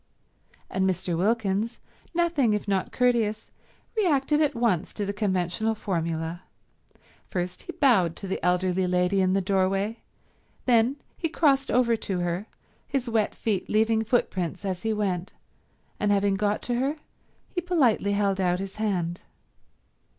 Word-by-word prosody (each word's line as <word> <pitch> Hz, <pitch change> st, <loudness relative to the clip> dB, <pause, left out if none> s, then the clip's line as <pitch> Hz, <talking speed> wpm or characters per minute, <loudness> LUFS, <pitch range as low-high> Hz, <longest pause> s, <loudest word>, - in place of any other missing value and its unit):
And 190 Hz, 0 st, +1 dB
Mr. 180 Hz, -1 st, -1 dB
Wilkins, 210 Hz, +3 st, 0 dB, 0.4 s
nothing 330 Hz, -10 st, +2 dB
if 210 Hz, -, -4 dB
not 195 Hz, -2 st, 0 dB
courteous, 230 Hz, -4 st, +1 dB, 0.4 s
reacted 300 Hz, -7 st, +2 dB
at 295 Hz, -2 st, +2 dB
once 230 Hz, -8 st, 0 dB
to 205 Hz, -, -2 dB
the 200 Hz, -, -2 dB
conventional 200 Hz, +1 st, 0 dB
formula. 165 Hz, -3 st, -2 dB, 0.9 s
First 180 Hz, 0 st, -3 dB
he 355 Hz, -, -8 dB
bowed 195 Hz, -, +3 dB
to 195 Hz, -, -7 dB
the 190 Hz, -, -3 dB
elderly 180 Hz, +1 st, +2 dB
lady 180 Hz, +2 st, +2 dB
in 185 Hz, 0 st, +2 dB
the 195 Hz, -, +2 dB
doorway, 195 Hz, +3 st, 0 dB, 0.7 s
then 240 Hz, +1 st, +4 dB, 0.2 s
he 330 Hz, -, -1 dB
crossed 275 Hz, -4 st, +2 dB
over 235 Hz, -2 st, +3 dB
to 195 Hz, -3 st, -3 dB
her, 175 Hz, +4 st, -2 dB, 0.4 s
his 270 Hz, -3 st, -2 dB
wet 225 Hz, -2 st, 0 dB
feet 205 Hz, -5 st, -2 dB
leaving 220 Hz, +1 st, +2 dB
footprints 195 Hz, -6 st, -1 dB
as 185 Hz, -2 st, -2 dB
he 225 Hz, -, 0 dB
went, 195 Hz, -4 st, -2 dB, 0.7 s
and 205 Hz, -, +2 dB
having 200 Hz, 0 st, +3 dB
got 205 Hz, +1 st, 0 dB
to 245 Hz, -, -1 dB
her 275 Hz, +4 st, 0 dB, 0.5 s
he 355 Hz, -, -3 dB
politely 265 Hz, -, +2 dB
held 200 Hz, -1 st, +1 dB
out 180 Hz, -1 st, +2 dB
his 195 Hz, +1 st, -6 dB
hand. 180 Hz, -5 st, -1 dB
205 Hz, 145 wpm, -26 LUFS, 185-235 Hz, 0.9 s, then